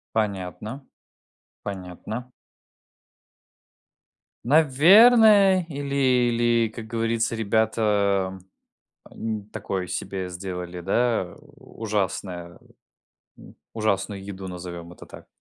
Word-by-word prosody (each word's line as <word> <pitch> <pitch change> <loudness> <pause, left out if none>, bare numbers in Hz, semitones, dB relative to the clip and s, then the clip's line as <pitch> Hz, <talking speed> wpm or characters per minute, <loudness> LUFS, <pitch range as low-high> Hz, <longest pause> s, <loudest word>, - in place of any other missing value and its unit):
Понятно, 105 +5 -3 0.8
понятно. 100 +6 -7 2.1
Наверное, 190 - +6
или 140 -2 -5
или, 120 -3 +2
как 110 0 -9
говорится, 115 0 -1
ребята, 105 -3 +1 0.7
м, 110 -2 -5
такое 95 -4 -4
себе 95 0 -4
сделали, 90 -1 -6
да, 110 0 0 0.2
ужасное, 95 -8 -4 0.8
м, - - -15 0.2
ужасную 100 -2 -1
еду, 95 -1 -7
назовем 85 -1 -8
это - - -13
так. - - -13
110 Hz, 80 wpm, -24 LUFS, 95-120 Hz, 2.1 s, Наверное